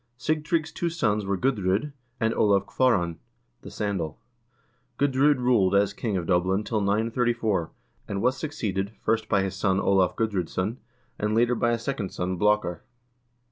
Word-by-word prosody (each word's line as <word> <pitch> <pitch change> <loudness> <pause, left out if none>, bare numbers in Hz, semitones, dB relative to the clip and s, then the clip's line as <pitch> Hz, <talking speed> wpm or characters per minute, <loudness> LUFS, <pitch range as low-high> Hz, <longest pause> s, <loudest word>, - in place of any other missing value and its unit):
Sigtrygg's 155 +2 -1
two 170 - -2
sons 110 -11 0
were 100 0 0
Gudr0d 100 -4 +1
1 150 -1 -8 0.3
and 115 0 +1
Olav 100 -2 +3
Kvaaran 90 -11 +1 0.4
(the - - -9
sandal). 95 -7 -3 0.8
Gudr0d 140 +1 +3
ruled 120 -7 +3
as 100 0 +3
king 105 -2 -2
of 85 - -3
Dublin 95 +3 +1
till 110 -1 -1
934, 110 -2 0 0.4
and 100 - -3
was 125 +5 +2
succeeded, 105 - -3
first 110 0 0
by 95 - +3
his 95 - -3
son 95 -2 +1
Olav 95 -2 +2
Gudr0dsson, 100 0 -1 0.4
and 105 +1 0
later 120 +2 +3
by 120 0 +1
a 120 - +1
second 115 -4 -3
son, 90 +1 -3
Blakar. 105 -3 +1
105 Hz, 155 wpm, -26 LUFS, 95-125 Hz, 0.8 s, Olav